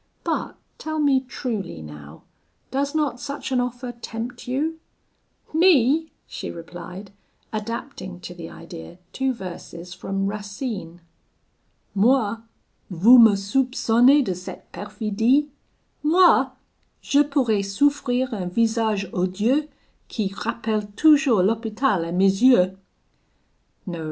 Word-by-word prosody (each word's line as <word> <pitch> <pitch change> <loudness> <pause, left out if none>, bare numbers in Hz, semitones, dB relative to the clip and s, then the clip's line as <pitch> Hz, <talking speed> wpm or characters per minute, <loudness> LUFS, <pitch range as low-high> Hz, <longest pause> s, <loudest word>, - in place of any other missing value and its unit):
But - - -2 0.2
tell 315 0 -4
me 280 -3 +4
truly, 235 - -5
now, 75 0 -12 0.5
does 280 +2 -1
not 295 -5 0
such 280 +3 -6
an 255 - +2
offer 245 0 -3
tempt 235 +1 -7
you?' 305 +6 -2 0.7
'Me!' 320 -2 +4
she - - -7
replied, 180 +3 -9 0.4
adapting 215 -3 -5
to 175 - -8
the 170 -2 -9
idea 170 0 -11 0.2
two 265 0 0
verses 180 -4 -8
from 195 +1 -3
Racine 200 -3 -5 0.9
Moi! 225 +1 +3 0.5
vous 210 +8 +7
me 225 -3 +8
soupconnez 250 +5 +3
de 190 - -2
cette 180 +1 -10
perfidie? 220 +7 0 0.5
Moi! 345 +4 +5 0.5
je 285 - +3
pourrais 260 -8 +1
souffrir 255 +4 0
un 190 -4 -3
visage 220 0 +1
odieux, 210 +12 0 0.4
Qui 210 -4 -2
rappelle 215 0 -2
toujours 285 -10 +5
l'Hopital 215 -1 0
a 170 - -5
mes 195 +3 +2
yeux? 190 -8 +5 1.1
'No!' 175 -4 -5
225 Hz, 110 wpm, -23 LUFS, 195-265 Hz, 1.1 s, me